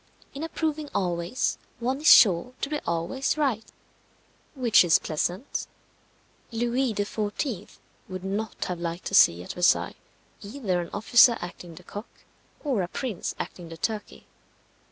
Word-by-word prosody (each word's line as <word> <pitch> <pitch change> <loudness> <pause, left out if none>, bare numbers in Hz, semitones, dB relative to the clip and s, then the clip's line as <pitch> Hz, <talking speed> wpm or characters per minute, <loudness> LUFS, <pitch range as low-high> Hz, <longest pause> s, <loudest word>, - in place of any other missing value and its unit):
In 275 - -7
approving 310 -2 -2
always, 175 +4 -1 0.2
one 260 +4 -1
is 310 - +7
sure 205 +5 +6
to 280 - -1
be 300 - -1
always 175 - -1
right 260 -8 0 0.9
which 245 -7 +5
is 170 -2 +5
pleasant. 175 - -3 0.8
Louis 240 +2 0
XIV. 205 - -3 0.3
would 185 -1 -6
not 205 +3 -3
have 180 -2 -4
liked 170 +1 -4
to - - -5
see 85 +1 +6
at - - -7
Versailles 180 0 +2 0.5
either 200 -5 -2
an 170 - -7
officer 235 +3 +5
acting 175 -1 -8
the 180 - -13
cock, 205 +5 -8 0.5
or 265 -9 0
a 175 - -2
prince 225 0 -4
acting 175 -2 -7
the 165 - -9
turkey. 215 +3 -4
205 Hz, 140 wpm, -26 LUFS, 175-255 Hz, 0.9 s, is